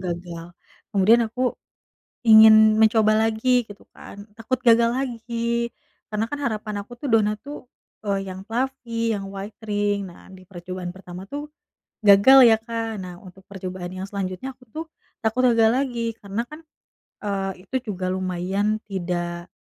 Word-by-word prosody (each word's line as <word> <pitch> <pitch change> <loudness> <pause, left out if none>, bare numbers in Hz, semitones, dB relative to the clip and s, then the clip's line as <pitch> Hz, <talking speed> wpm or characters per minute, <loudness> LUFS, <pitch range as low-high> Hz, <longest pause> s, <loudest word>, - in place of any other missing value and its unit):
gagal. 170 -2 -5 0.5
Kemudian 215 +4 +5
aku 250 +1 -1 0.7
ingin 220 0 +8
mencoba 220 -1 +4
lagi, 245 +2 +2
gitu 205 0 -13
kan, 200 - -11 0.2
takut 250 +3 -2
gagal 235 -1 +5
lagi. 235 -2 -2 0.4
Karena 215 +1 0
kan 290 - -3
harapan 215 -2 -3
aku 240 - -15
tuh 285 - -4
donat 210 -1 +3
tuh, 290 -1 -8 0.4
eee, 195 -1 -1
yang 190 +1 -9
fluffy, 235 -2 -2
yang 195 - -6
white 200 +2 -8
ring 205 -1 0
nah, - - -16
di 185 0 -14
percobaan 180 -1 -7
pertama 185 -1 -10
tuh, 290 +1 -5 0.6
gagal 210 +7 +8
ya 220 - +6
Kak. 225 -2 -4
Nah 180 -1 -8
untuk 185 0 -15
percobaan 185 -2 -6
yang 185 - -5
selanjutnya 200 +6 -4
aku 255 - -20
tuh, 320 +5 -6 0.4
takut 220 +4 +1
gagal 225 -1 +5
lagi 240 -4 -1
karena 200 +3 -3
kan, 305 +1 -10 0.7
eee, 195 -2 -3
itu 260 0 -2
juga 185 0 -4
lumayan 190 +3 -1
tidak, 175 -2 -3
215 Hz, 150 wpm, -23 LUFS, 190-235 Hz, 0.7 s, ingin